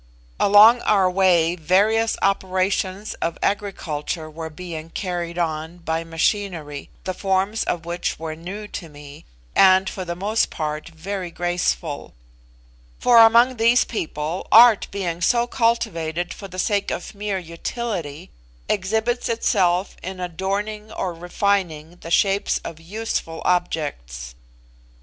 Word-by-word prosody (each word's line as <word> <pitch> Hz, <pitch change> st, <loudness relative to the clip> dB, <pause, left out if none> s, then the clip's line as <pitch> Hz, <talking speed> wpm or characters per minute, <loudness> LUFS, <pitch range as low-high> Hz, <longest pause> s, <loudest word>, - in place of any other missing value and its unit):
Along 215 Hz, +4 st, +7 dB
our 195 Hz, -3 st, +3 dB
way 180 Hz, -3 st, +3 dB
various 205 Hz, +7 st, +2 dB
operations 190 Hz, +1 st, 0 dB
of 165 Hz, -, -1 dB
agriculture 165 Hz, -6 st, -2 dB
were 160 Hz, +1 st, -6 dB
being 165 Hz, 0 st, -8 dB
carried 175 Hz, -1 st, -4 dB
on 160 Hz, 0 st, -2 dB
by 165 Hz, -1 st, -2 dB
machinery, 165 Hz, -3 st, -2 dB
the 185 Hz, -, -3 dB
forms 195 Hz, +3 st, 0 dB
of 170 Hz, -1 st, -2 dB
which 175 Hz, +1 st, -3 dB
were 160 Hz, -1 st, -5 dB
new 195 Hz, +6 st, -7 dB
to 165 Hz, -, -7 dB
me, 145 Hz, 0 st, -13 dB, 0.3 s
and 190 Hz, 0 st, +6 dB
for 190 Hz, -, -4 dB
the 170 Hz, -1 st, -4 dB
most 210 Hz, +5 st, 0 dB
part 155 Hz, 0 st, -4 dB
very 180 Hz, +3 st, -5 dB
graceful; 175 Hz, -3 st, -2 dB, 0.8 s
for 240 Hz, -2 st, +5 dB
among 235 Hz, +3 st, +6 dB
these 230 Hz, +2 st, +4 dB
people 160 Hz, -4 st, -4 dB
art 230 Hz, -1 st, +7 dB
being 180 Hz, -4 st, -3 dB
so 235 Hz, +6 st, +3 dB
cultivated 185 Hz, -9 st, -1 dB
for 195 Hz, -, -9 dB
the 185 Hz, -1 st, -11 dB
sake 200 Hz, +2 st, 0 dB
of 180 Hz, -, -5 dB
mere 205 Hz, -1 st, -3 dB
utility, 170 Hz, -, -5 dB, 0.4 s
exhibits 220 Hz, +5 st, 0 dB
itself 190 Hz, -5 st, +1 dB
in 185 Hz, +1 st, -6 dB
adorning 200 Hz, +4 st, -3 dB
or 180 Hz, -2 st, -3 dB
refining 175 Hz, -2 st, -1 dB
the 165 Hz, -, -10 dB
shapes 195 Hz, +3 st, +2 dB
of 160 Hz, -, -7 dB
useful 175 Hz, -3 st, -4 dB
objects. 105 Hz, -, -2 dB
185 Hz, 125 wpm, -22 LUFS, 165-205 Hz, 0.8 s, Along